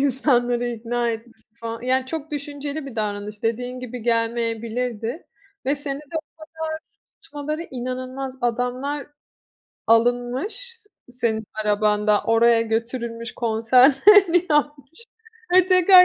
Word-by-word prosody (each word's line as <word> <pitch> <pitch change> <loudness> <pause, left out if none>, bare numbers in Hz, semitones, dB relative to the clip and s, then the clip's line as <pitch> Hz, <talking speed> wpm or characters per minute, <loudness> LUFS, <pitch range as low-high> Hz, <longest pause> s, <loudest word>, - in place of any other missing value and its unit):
insanları 245 -3 +2
ikna 235 0 -1
etmesi 230 0 -9
falan 230 0 -5
yani 255 +1 +1
çok 315 +1 -5
düşünceli 285 0 -5
bir 245 -4 -9
davranış 210 0 -4
dediğin 245 +3 -2
gibi 250 -1 -7
gelmeyebilirdi 230 +2 -1 0.4
ve 280 - +3
seni 280 -1 -5
de 300 +2 -7
o - - 0 0.3
kadar 320 0 -5 0.4
tutmaları 305 +3 -5
inanılmaz, 255 +1 -5
adamlar 250 +4 -1 0.8
alınmış 245 - +1
s 420 -2 -22 0.2
senin 225 -3 -1 0.2
arabanda, 210 0 +2
oraya 230 0 +4
götürülmüş 230 +1 -3
konserlerini 270 - +5
yapmış 295 - -1 0.5
ve 370 0 +6
tekrar 365 0 +8
250 Hz, 110 wpm, -23 LUFS, 230-290 Hz, 0.8 s, tekrar